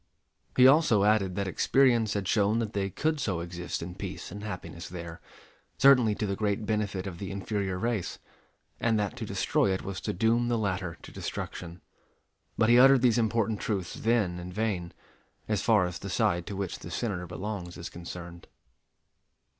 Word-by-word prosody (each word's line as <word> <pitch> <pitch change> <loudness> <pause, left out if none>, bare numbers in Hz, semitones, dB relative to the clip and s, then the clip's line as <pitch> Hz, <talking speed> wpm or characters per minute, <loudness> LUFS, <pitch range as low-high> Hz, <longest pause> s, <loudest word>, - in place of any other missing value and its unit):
He 125 - +8
also 135 -8 +5
added 100 -3 +2
that 100 0 -1
experience 120 +1 +3
had 100 -2 -2
shown 105 +1 +2
that 115 -2 -2
they 100 -1 -1
could 155 - -1
so 95 -10 -1
exist 85 0 -5
in 90 +1 -6
peace 95 -1 -7
and 105 +2 -7
happiness 85 -5 -6
there, 85 -2 -8 0.6
certainly 125 -6 +6
to 105 - -2
the 100 -1 -1
great 105 0 -1
benefit 100 -3 -1
of 90 -3 -6
the 100 - -5
inferior 100 -1 -2
race; 115 -2 -2 0.6
and 115 -1 +2
that 105 -2 -1
to - - -4
destroy 100 - +1
it 95 - -2
was 95 -1 -5
to - - -2
doom 115 +5 +2
the 120 -1 +1
latter 90 -5 -2
to - - -10
destruction. 85 0 -6 0.8
But 110 - +3
he 120 +1 +7
uttered 135 0 +7
these 120 -2 +4
important 110 -2 +1
truths 95 -5 -2
then 110 -7 +1
in 90 +1 -7
vain, 95 -4 -2 0.6
as 105 -2 0
far 105 -5 +4
as 90 0 -5
the - - -6
side 85 0 +1
to 100 - -5
which 95 -2 -4
the - - -9
Senator 90 -2 -3
belongs 90 0 -5
is 85 - -6
concerned. 85 0 -9
100 Hz, 180 wpm, -28 LUFS, 90-110 Hz, 0.8 s, He